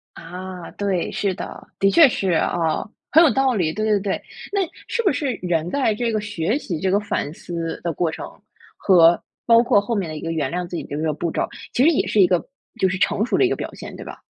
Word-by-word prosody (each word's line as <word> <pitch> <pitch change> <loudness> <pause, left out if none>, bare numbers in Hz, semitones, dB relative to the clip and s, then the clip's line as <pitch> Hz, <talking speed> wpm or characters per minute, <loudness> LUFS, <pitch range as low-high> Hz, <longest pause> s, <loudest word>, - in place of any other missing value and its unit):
啊， 180 0 -8
对， 195 -4 -1
是 195 -2 -1
的。 - - -8
的 195 - +3
确 320 +5 +7
是 195 -6 -1
哦， 165 +1 0 0.2
很 320 - +7
有 305 - +5
道 270 -1 +2
理， 170 -7 0
对 215 +5 -2
对 210 -2 +3
对。 195 -1 -2 0.3
那 400 - +1 0.3
是 470 - -1
不 390 - +3
是 280 -5 -1
人 175 -2 0
在 260 -4 +1
这 230 +1 -1
个 215 - 0
学 205 - -1
习 175 - -4
这 190 - +1
个 200 +2 +3
反 205 -7 -3
思 165 0 -5
的 170 - -1
过 165 +1 0
程， - - -7 0.5
和 170 -3 +5 0.3
包 230 0 +6
括 205 - +4
后 205 +4 -3
面 195 -6 -1
的 155 - -6
一 - - -6
个 165 - -4
原 150 -5 -1
谅 180 0 -2
自 175 - -5
己 - - -3
的 145 - -6
一 - - -3
个 155 -1 +1
步 170 +3 -2
骤， - - -1 0.2
其 250 - +2
实 295 - +6
也 315 - +1
是 210 - +2
一 185 - +7
个 180 -1 +1 0.3
就 190 - +3
是 185 0 -2
成 205 +3 +1
熟 - - 0
的 - - +4
一 - - +1
个 - - -1
表 - - -5
现， - - -9
对 - - -9
吧？ - - -10
190 Hz, 275 characters per minute, -22 LUFS, 170-220 Hz, 0.5 s, 确